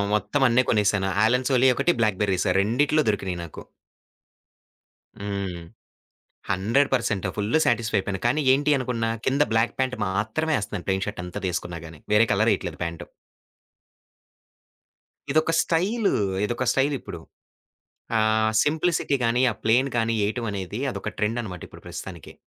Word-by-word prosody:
ఆ - - +2
మొత్తం 135 +6 0
అన్నీ 125 +2 +4
కొనేశాను. 100 -3 +2 0.2
'ఆలన్ 125 +2 +2
సోలీ' 130 0 +5
ఒకటి 175 - +2
'బ్లాక్ 105 -4 +1
బెర్రీస్' 95 -1 +1
రెండిటిల్లో 145 +9 +2
దొరికినీయి 95 -4 -1
నాకు. 80 - -10 1.6
హ్మ్. 100 -4 -4 0.9
100% 115 +1 +1
ఫుల్లు 105 +9 +1
సాటిస్ఫైపోయాను. 105 -4 0
కానీ 135 +6 +2
ఏంటి 145 +2 +2
అనుకున్నా 120 -3 -2 0.2
కింద 135 +2 +2
బ్లాక్ 115 +1 +1
ప్యాంట్ 130 -1 0
మాత్రమే 110 +11 -1
ఏస్తన్నాను. 100 -2 -5
ప్లెయిన్ 95 0 0
షర్ట్ 105 -4 -5
ఎంతదేసుకున్నా 90 -1 -4
గాని. 80 -2 -12
వేరే 105 +2 +6
కలరేఎయట్లేదు - - +1
ప్యాంటు. 85 -1 -5 2.2
ఇదొక 155 +2 +2
స్టైలు. 200 +7 +1 0.3
ఇదొక 120 +3 -2
స్టైలిప్పుడు. 135 0 -1 1.0
ఆహ్, 110 0 +2
సింప్లిసిటీ 160 -1 +1
గాని, 115 +2 +2
ఆ - - -5
ప్లెయిన్ 125 +5 +3
గాని 115 0 +1
ఏయటం 115 +2 -2
అనేది 100 +4 -5
అదొక 105 - -5
ట్రెండనమాటిప్పుడు 105 -5 -4
ప్రస్తుతానికి. - - -8
110 Hz, 125 wpm, -24 LUFS, 100-130 Hz, 2.2 s, వేరే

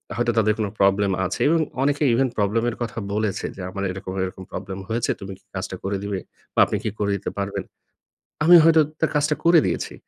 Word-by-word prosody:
হয়তো 120 +1 +1
তাদের 110 -1 +4
কোনো 105 - 0
প্রবলেম 100 0 +3
আছে - - -3
এবং 165 0 +3 0.2
অনেকে 145 +2 +1
ইভেন 130 +2 +2
প্রবলেম 105 +3 +1
এর 115 - -5
কথা 115 -1 -4 0.2
বলেছে। 105 -2 -1
যে - - -8
আমার 100 +1 -5
এরকম, 95 0 -7
এরকম 95 0 -6
প্রবলেম 95 +1 -6
হয়েছে 115 +1 0
তুমি 95 0 -6
কি - - -36
কাজটা 95 0 -4
করে 100 +1 -1
দিবে 100 -2 -2 0.3
বা - - 0
আপনি - - -2
কি - - 0
করে 100 -1 0
দিতে 100 - -4
পারবেন। 100 0 -3 0.8
আমি 175 +3 +8
হয়তো 160 -1 +6 0.2
তার 160 - +2
কাজটা 150 +1 +2
করে 170 -1 +7
দিয়েছি। - - -2
105 Hz, 210 wpm, -23 LUFS, 100-130 Hz, 0.8 s, আমি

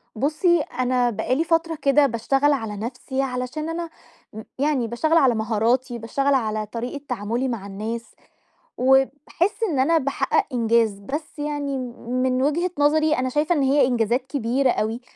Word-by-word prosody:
بُصي 310 - +2
أنا 250 -3 0
بقى 240 +3 -1
لي 320 - +1
فترة 330 0 +1
كده 280 +1 +4
باشتغل 270 +4 +1
على 225 -6 -3
نفسي 250 +4 -4
علشان 260 +4 -3
أنا 335 0 -4 0.4
م 220 - -7 0.2
يعني 280 -4 +1
باشتغل 310 +8 +1
على 265 -7 +4
مهاراتي، 235 +3 0
باشتغل 275 +5 0
على 215 -4 0
طريقة 245 +6 -5
تعاملي 235 +2 -2
مع 230 -6 -4
الناس، 220 +4 -5 0.7
وباحس 270 - +1
إن 280 - 0
أنا 325 +6 +3
باحقق 280 +8 0
إنجاز. 230 -3 +2
بس 295 +9 -6
يعني 290 -2 -2 0.3
من 255 +1 0
وجهة 335 +5 +1
نظري 305 +1 +3
أنا 255 0 0
شايفة 300 +6 +1
إن 290 - +1
هي 270 0 +4
إنجازات 245 +1 0
كبيرة 260 0 +1
أوي، 225 +2 -2
260 Hz, 155 wpm, -23 LUFS, 235-295 Hz, 0.7 s, كده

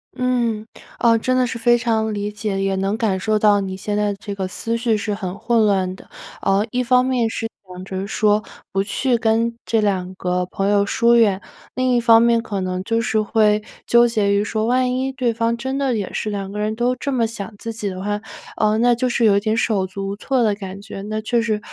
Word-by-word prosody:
嗯， 240 -4 0 0.3
哦， 230 -1 +4
真 255 +3 0
的 255 - +3
是 235 -1 -4
非 240 +1 +4
常 220 -2 0
理 205 0 -3
解， 210 -2 -3
也 195 0 0
能 195 +3 -1
感 210 -5 0
受 215 +2 +1
到 205 -1 +4
你 190 -1 -4
现 205 +2 -3
在 210 0 +1
的 - - -8
这 200 - -6
个 195 -2 -3
思 230 +5 -3
绪 230 -1 +1
是 210 0 -2
很 195 -2 -5
混 230 -1 +2
乱 190 -3 +1
的。 - - -16 0.3
呃， 195 +2 +2
一 250 - 0
方 250 +1 +3
面 250 -3 +1
是 225 - -3 0.2
想 180 0 -9
着 190 +1 -4
说， 210 0 +2 0.3
不 195 - +1
去 235 +5 0
跟 230 +1 +1
这 225 -2 +1
2 185 -3 -1
个 180 -1 -1
朋 195 +2 -2
友 200 -1 +3
疏 235 +3 +3
远； 210 -5 +4 0.4
另 255 0 +1
一 240 - +4
方 230 -1 +6
面 235 0 +3
可 200 -4 -4
能 185 0 -2
就 230 +3 0
是 225 -2 +1
会 210 0 +2 0.2
纠 240 0 +5
结 210 -3 +1
于 200 +1 +2
说 215 0 -1
万 250 +1 +1
一 265 +1 -1
对 255 -3 -1
方 230 +1 0
真 265 +3 -3
的 270 -3 0
也 205 -4 -3
是 215 - -2
2 200 -2 -4
个 205 - -6
人 215 +1 -1
都 245 +2 +1
这 280 +2 -3
么 235 -3 +1
想 220 -2 -7
自 230 - -5
己 210 -2 -3
的 185 -1 -6
话， 205 +1 -2 0.3
呃， 215 0 +2
那 240 +1 +4
就 250 +2 0
是 240 -1 +1
有 200 -2 +5
一 - - +4
点 215 +2 0
手 210 -4 +1
足 195 +1 -5
无 200 - -3
措 255 +5 0
的 215 -3 +2
感 195 -1 -8
觉。 205 -1 -8
那 215 +1 -3
确 235 +2 +1
实 220 -2 -1
215 Hz, 255 characters per minute, -20 LUFS, 200-235 Hz, 0.4 s, 方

